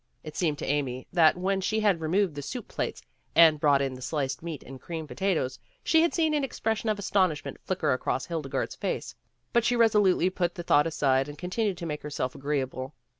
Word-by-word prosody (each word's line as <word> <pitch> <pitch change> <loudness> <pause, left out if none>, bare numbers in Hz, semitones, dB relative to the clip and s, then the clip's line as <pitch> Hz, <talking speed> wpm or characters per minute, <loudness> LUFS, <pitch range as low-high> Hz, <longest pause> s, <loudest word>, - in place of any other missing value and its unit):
It 155 -1 -8
seemed 155 -5 0
to - - -5
Amy 135 -3 -1
that, 165 -1 +5
when 190 +1 0
she 215 +3 0
had 200 -6 +2
removed 180 +2 +1
the 145 - -5
soup 235 - -6
plates - - -4 0.3
and 160 -2 +7
brought 145 -2 +4
in 135 -1 -2
the 130 - -10
sliced 135 -1 -2
meat 165 -3 -6
and 130 0 -11
creamed 160 -3 -6
potatoes, 165 -10 -1 0.2
she 320 0 +4
had 335 - +3
seen 320 -2 +1
an 295 -2 +1
expression 225 -4 -1
of 215 - +1
astonishment 190 -6 0
flicker 165 -7 0
across 130 +1 -1
Hildegarde's 160 -6 -3
face, - - -3 0.4
but 235 - +4
she 245 - +2
resolutely 205 -5 +4
put 175 -2 -1
the 175 - -5
thought 150 -2 +4
aside 135 -3 +1
and 145 - -9
continued 185 +3 -1
to 170 - -6
make 150 -2 -4
herself 140 -3 -3
agreeable. 135 -1 -3
165 Hz, 205 wpm, -28 LUFS, 145-195 Hz, 0.4 s, and